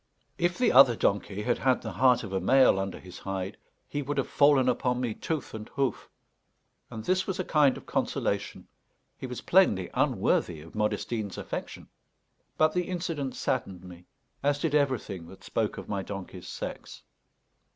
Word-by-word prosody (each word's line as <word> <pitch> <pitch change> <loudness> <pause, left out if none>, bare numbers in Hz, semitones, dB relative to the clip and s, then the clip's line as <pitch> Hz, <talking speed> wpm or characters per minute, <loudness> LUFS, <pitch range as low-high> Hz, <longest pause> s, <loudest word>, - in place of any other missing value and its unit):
If 175 +1 +1
the 250 - +3
other 125 -2 +8
donkey 100 -1 0
had 120 +1 0
had 130 -1 +2
the - - -4
heart 125 -2 +3
of 100 -3 -7
a 95 - +1
male 130 0 +5
under 95 0 -3
his 90 -1 -11
hide, 95 -1 -4 0.3
he 145 - -3
would 145 +1 -3
have - - 0
fallen 140 -3 +4
upon 125 0 +1
me 120 -3 -1
tooth 155 +5 -4
and 110 -1 -7
hoof; 135 -5 -2 0.8
and 110 -1 -7
this 185 +1 +1
was 190 0 -3
a - - +1
kind 145 -4 +3
of - - -12
consolation - - -2 0.5
he 130 - -7
was 125 -1 -6
plainly 105 - +3
unworthy 80 -3 +1
of 80 +2 -13
Modestine's 105 0 -2
affection. - - -6 0.7
But 155 0 +4
the 180 -1 0
incident 165 -7 -3
saddened 95 -8 -2
me, 90 -1 -12 0.3
as 145 0 +2
did 150 0 -1
everything 130 - 0
that 95 - -14
spoke - - -1
of - - -7
my 100 -2 -2
donkey's 95 -2 -7
sex. - - -7
125 Hz, 170 wpm, -28 LUFS, 100-145 Hz, 0.8 s, other